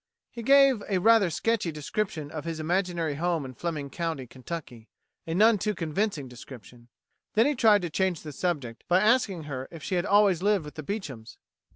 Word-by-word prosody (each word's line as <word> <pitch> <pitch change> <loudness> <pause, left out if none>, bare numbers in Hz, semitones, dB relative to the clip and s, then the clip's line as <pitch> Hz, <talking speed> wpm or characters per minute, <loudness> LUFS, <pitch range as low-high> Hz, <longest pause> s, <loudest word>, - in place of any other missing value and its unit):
He 235 - -7
gave 275 -1 +5
a 195 - +2
rather 220 0 +5
sketchy 220 0 0
description 155 0 -3
of 155 -2 -5
his 165 -1 -4
imaginary 170 -1 -1
home 165 0 -1
in 130 - -8
Fleming 150 0 -4
County, 165 -6 -3
Kentucky 125 -2 -8 0.4
a 165 - -2
none 215 +2 +5
too 210 +2 -1
convincing 165 -2 -2
description. 120 -1 -13 0.5
Then 225 +2 +5
he 295 - +2
tried 215 -6 +4
to 175 - -2
change 185 -1 0
the 155 - -7
subject 140 -7 -3
by 180 +1 +4
asking 210 -5 +2
her 135 -3 -6
if 165 -3 -11
she - - -4
had 180 0 +1
always 200 -4 +4
lived 200 -4 +2
with 150 - -9
the 155 - -7
Beechams. 140 - -6
170 Hz, 190 wpm, -27 LUFS, 145-205 Hz, 0.5 s, gave